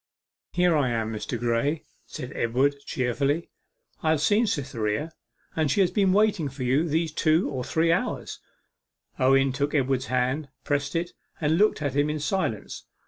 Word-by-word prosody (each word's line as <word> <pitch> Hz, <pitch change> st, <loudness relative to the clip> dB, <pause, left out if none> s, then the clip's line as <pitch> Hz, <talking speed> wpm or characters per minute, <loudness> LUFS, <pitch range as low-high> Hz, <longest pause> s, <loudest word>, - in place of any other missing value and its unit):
'Here 180 Hz, -2 st, +3 dB
I 140 Hz, -4 st, +2 dB
am, 115 Hz, -1 st, -1 dB
Mr. 110 Hz, +3 st, -4 dB
Graye,' 120 Hz, +6 st, 0 dB, 0.2 s
said 125 Hz, +2 st, -7 dB
Edward 130 Hz, +5 st, +1 dB
cheerfully. 140 Hz, +6 st, -1 dB, 0.5 s
'I 160 Hz, -, +1 dB
have 155 Hz, -2 st, +2 dB
seen 215 Hz, +7 st, +3 dB
Cytherea, 135 Hz, -, -2 dB, 0.4 s
and 155 Hz, -2 st, +1 dB
she 195 Hz, -, +3 dB
has 185 Hz, -2 st, +3 dB
been 195 Hz, 0 st, +3 dB
waiting 200 Hz, -7 st, +2 dB
for 130 Hz, 0 st, -6 dB
you 140 Hz, +7 st, +2 dB
these 160 Hz, +1 st, 0 dB
two 155 Hz, +3 st, +2 dB
or 130 Hz, -3 st, -3 dB
three 165 Hz, +5 st, +1 dB
hours.' -, -, -2 dB, 0.8 s
Owen 135 Hz, +1 st, +4 dB
took 140 Hz, +3 st, -1 dB
Edward's 135 Hz, -3 st, +1 dB
hand, 130 Hz, +4 st, 0 dB
pressed 145 Hz, 0 st, -1 dB
it, 175 Hz, +1 st, -1 dB, 0.3 s
and 160 Hz, +2 st, +1 dB
looked 210 Hz, -7 st, +3 dB
at 140 Hz, -2 st, -2 dB
him 145 Hz, +1 st, +2 dB
in 150 Hz, 0 st, -2 dB
silence. 150 Hz, -, -2 dB
145 Hz, 165 wpm, -26 LUFS, 130-165 Hz, 0.8 s, Owen